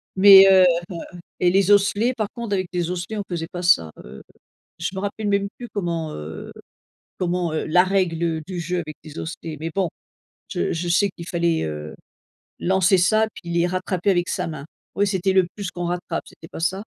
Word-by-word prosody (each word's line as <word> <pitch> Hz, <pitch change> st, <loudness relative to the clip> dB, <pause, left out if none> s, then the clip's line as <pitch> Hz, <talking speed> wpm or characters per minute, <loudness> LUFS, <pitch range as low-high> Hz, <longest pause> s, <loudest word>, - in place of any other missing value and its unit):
mais 195 Hz, 0 st, +9 dB
heu 190 Hz, -1 st, +7 dB
heu -, -, +7 dB, 0.7 s
et 180 Hz, -, +3 dB
les 195 Hz, +1 st, +3 dB
osselets 205 Hz, +4 st, +3 dB
par 215 Hz, -3 st, -2 dB
contre 235 Hz, -4 st, -3 dB
avec 185 Hz, -1 st, -1 dB
des 175 Hz, -1 st, -1 dB
osselets 180 Hz, +4 st, -4 dB
on -, -, -1 dB
faisait 165 Hz, -2 st, -3 dB
pas 180 Hz, -1 st, -5 dB
ça. 85 Hz, -, +3 dB
Heu, 65 Hz, +2 st, -11 dB, 0.6 s
je -, -, -1 dB
me -, -, -5 dB
rappelle 205 Hz, +1 st, -3 dB
même 200 Hz, 0 st, +1 dB
plus 240 Hz, -1 st, -7 dB
comment, 170 Hz, -5 st, -3 dB
heu, 75 Hz, +1 st, -8 dB, 0.7 s
comment, 175 Hz, -2 st, -1 dB
heu 160 Hz, -, -2 dB
la 180 Hz, +3 st, +5 dB
règle 170 Hz, -4 st, 0 dB
du 185 Hz, -2 st, -5 dB
jeu 180 Hz, +2 st, -2 dB
avec 155 Hz, -3 st, -6 dB
des 155 Hz, 0 st, -9 dB
osselets 160 Hz, -1 st, -6 dB
mais 160 Hz, +1 st, -3 dB
bon 190 Hz, -3 st, +1 dB, 0.6 s
je -, -, -1 dB
je 170 Hz, +1 st, -3 dB
sais 200 Hz, +4 st, +3 dB
qu'il 170 Hz, -, -9 dB
fallait, 170 Hz, -3 st, 0 dB
heu, 75 Hz, 0 st, -6 dB, 0.7 s
lancer 190 Hz, +1 st, +3 dB
ça 215 Hz, +5 st, +3 dB
puis 170 Hz, -, -8 dB
les 170 Hz, 0 st, +2 dB
rattraper 185 Hz, +1 st, -1 dB
avec 175 Hz, -1 st, 0 dB
sa 180 Hz, -1 st, -2 dB
main 155 Hz, -4 st, -7 dB, 0.3 s
ouais 205 Hz, -, +2 dB
c'était 190 Hz, -1 st, 0 dB
le 190 Hz, -2 st, +4 dB
plus 200 Hz, -3 st, -4 dB
qu'on 175 Hz, 0 st, -4 dB
rattrape 175 Hz, -1 st, -3 dB
c'était 160 Hz, -, -14 dB
pas -, -, -9 dB
ça? 190 Hz, +4 st, -1 dB
180 Hz, 200 wpm, -22 LUFS, 170-195 Hz, 0.7 s, mais